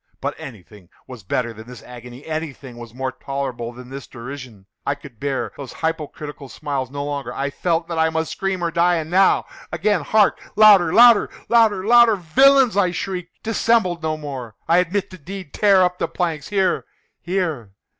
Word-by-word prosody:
But - - -3
anything 105 -6 -12 0.2
was 125 -3 -10
better 115 +5 -2
than 110 +1 -12
this 125 -1 -11
agony! 125 +1 -11
Anything 150 -6 -6
was 120 -1 -10
more 130 +2 -4
tolerable 130 -4 -5
than 125 +1 -12
this 135 0 -8
derision! 120 -5 -10 0.2
I 140 - -1
could 140 -6 -15
bear 140 -1 -2
those 140 -3 -8
hypocritical 150 -3 -5
smiles 140 -4 -4
no 140 +1 -5
longer! 145 -1 -4
I 140 +1 -3
felt 165 +1 -1
that 165 -2 -3
I 160 0 +3
must 160 0 -2
scream 190 -2 -3
or 170 - 0
die! 175 +1 +3
and 160 -1 -4
now—again!—hark! 195 +1 +1 0.2
louder! 205 -6 +7
louder! 235 0 +6 0.2
louder! 220 -5 +3
louder! 235 -1 +6
"Villains!" 255 +8 +4
I 200 -3 +3
shrieked, 180 -1 -6
"dissemble 225 -5 +1
no 155 -1 -2
more! 135 -7 -7
I 170 +2 +4
admit 190 +3 -1
the 185 - -11
deed!—tear 190 +3 +1
up 180 0 -1
the - - 0
planks!—here, 180 +3 -1 0.4
here! 165 - -3
160 Hz, 165 wpm, -21 LUFS, 135-190 Hz, 0.4 s, louder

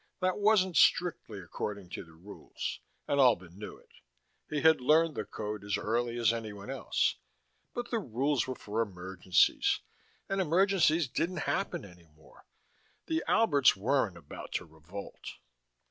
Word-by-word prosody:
That 185 +1 0
wasn't 200 -4 +3
strictly 165 -11 +3
according 95 +1 -6
to - - -5
the 80 - -17
rules, 95 +5 -7 0.3
and 140 - +1
Albin 95 -10 +3
knew 105 - -8
it: - - -24 0.6
he 150 -2 -1
had 160 -4 +5
learned 155 +4 +4
the - - -4
code 105 -1 -5
as 100 -1 -1
early 120 +2 -1
as 115 -1 +3
anyone 110 0 -6
else. 135 - 0 0.6
But 240 -1 -4
the 230 - +1
rules 135 - 0
were 130 - -3
for 110 0 -3
emergencies 95 -3 +1 0.5
and 195 0 0
emergencies 175 -2 +3
didn't 170 +7 -2
happen 195 - -2
any 90 -3 -16
more. 80 - -20 0.6
The 320 0 -1
Alberts 145 - +4
weren't 110 -3 0
about 75 -4 -10
to - - -2
revolt. 80 +5 -10
120 Hz, 145 wpm, -31 LUFS, 100-165 Hz, 0.6 s, had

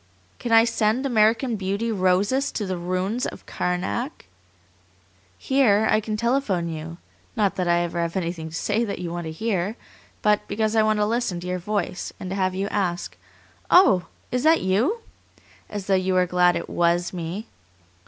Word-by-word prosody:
Can 240 - -4
I 225 0 +7
send 225 +3 +1
American 225 0 +2
Beauty 200 +4 -2
roses 200 +8 +1
to 210 - -2
the 185 -1 -2
ruins 185 +6 -2
of - - -9
Karnak? 185 - -3 1.1
Here 220 -6 +3
I - - +4
can 215 0 -3
telephone 220 -8 0
you; 165 +1 -6 0.4
not 205 -4 +1
that 180 -2 0
I 175 0 +3
ever 170 0 -2
have 170 +1 -2
anything 170 -3 -3
to 160 - -9
say 215 +6 0
that 205 -3 -3
you 175 -2 -5
want 175 0 -4
to 160 - -4
hear, 200 +2 -1 0.5
but 210 -1 +2
because 215 +2 -1
I 220 - +5
want 215 0 +2
to 210 - +2
listen 225 -5 -1
to 180 - -7
your 180 0 -2
voice, 195 -1 -3
and 185 - -6
to - - -2
have 185 -1 0
you 195 +1 -1
ask, 180 -4 -2 0.5
'Oh! 190 - +5 0.2
is 250 - 0
that 320 +3 +4
YOU?' 230 - +1 0.7
as 205 -2 -5
though 195 - +1
you 185 0 +2
were 180 0 +4
glad 180 0 +3
it - - -3
WAS 175 +1 +1
me. 180 +5 -5
195 Hz, 185 wpm, -24 LUFS, 180-225 Hz, 1.1 s, I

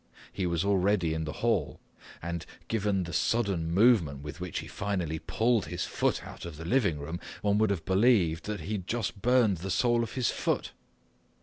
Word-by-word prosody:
He 95 - -1
was 85 +1 0
already 95 -4 +2
in 80 0 -2
the 75 - -3
hall, - - +1 0.4
and 85 -1 -3 0.2
given 105 -4 0
the 85 -1 -6
sudden 95 -3 +1
movement 90 - +4
with 75 +3 -8
which 90 -2 -4
he - - -4
finally 90 -6 -2
pulled 110 +5 +1
his 90 +2 -3
foot - - 0
out - - -10
of 85 -3 -7
the 80 - -7
living 100 - +2
room, 80 +4 -5 0.2
one 105 0 +3
could 110 -1 +3
have 90 -5 -2
believed 95 -5 +3
that 105 -4 -3
he 95 - -6
had 95 -4 -3
just 110 -3 -2
burned 120 -4 +4
the 95 +4 -6
sole 120 +5 +2
of 115 - -4
his 130 -4 +1
foot. - - -1
95 Hz, 195 wpm, -29 LUFS, 85-110 Hz, 0.4 s, movement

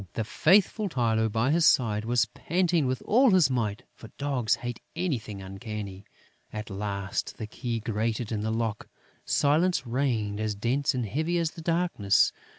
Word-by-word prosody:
The 110 - -1
faithful 195 - +3
Tylô, 110 -6 +1
by 115 +5 +1
his 165 +2 +3
side, 110 -7 +3
was 120 0 +2
panting 170 - 0
with 130 0 -2
all 255 +4 +5
his 180 -9 +4
might, 110 -5 -1
for 115 - -12
dogs 135 -5 +1
hate 120 -2 -6 0.2
anything 115 - -3
uncanny. 100 0 -7 0.5
At 105 0 -6
last, 100 -1 -3
the 110 - -4
key 115 +2 -4
grated 110 +1 -2
in 105 -2 -1
the 110 - -2
lock. 110 -1 -2 0.4
Silence 155 +2 +2
reigned 115 -5 -1
as 110 -1 -1
dense 125 +7 0
and 125 -2 -1
heavy 160 - -1
as 165 -2 0
the 170 - -10
darkness. 165 - +2
115 Hz, 160 wpm, -27 LUFS, 105-150 Hz, 0.5 s, all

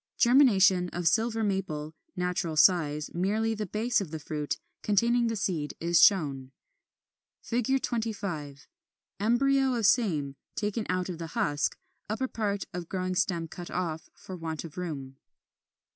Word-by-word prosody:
Germination 195 -9 +5
of 175 -1 -2
Silver 225 +4 +2
Maple, 170 -7 -2 0.2
natural 180 -3 -2
size; 150 -4 +3
merely 215 +6 0
the 210 -2 -4
base 220 +5 0
of 190 - -5
the 160 - -5
fruit, 150 -1 -3 0.2
containing 235 +3 +2
the 225 - -1
seed, 170 -7 -2
is 170 0 +3
shown. 140 -9 +3 1.0
25. 215 - -2 0.5
Embryo 265 +4 +2
of 230 -3 0
same, 160 - +2 0.2
taken 210 +1 -2
out 185 0 0
of 175 -3 -6
the 165 - -5
husk; 145 0 0 0.3
upper 225 +5 -1
part 205 -5 -2
of 175 -1 -6
growing 185 -1 -2
stem 180 -3 0
cut 175 +1 -9
off, 165 -3 -3
for 185 - -9
want 160 -3 -5
of 160 -3 -10
room. 140 -7 -5
185 Hz, 140 wpm, -28 LUFS, 160-220 Hz, 1.0 s, Germination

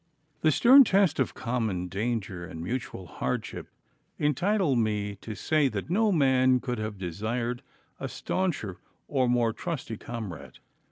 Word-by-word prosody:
The 155 - +4
stern 260 - +8
test 195 - +3
of 130 - 0
common 110 -7 -2
danger 100 -2 -3
and 80 -1 -8
mutual 120 -2 -4
hardship 85 - -4 0.5
entitle 165 +2 +1
me 105 -3 0
to 110 +2 -7
say 150 +7 +2
that 145 - -4
no 215 +3 +3
man 130 -5 +4
could 125 -2 -3
have 110 -1 -4
desired 110 +7 -3 0.4
a - - -3
stauncher 160 - -2 0.3
or 130 -3 +1
more 120 -2 +2
trusty 135 - -4
comrade. 90 - -7
120 Hz, 135 wpm, -28 LUFS, 105-150 Hz, 0.5 s, stern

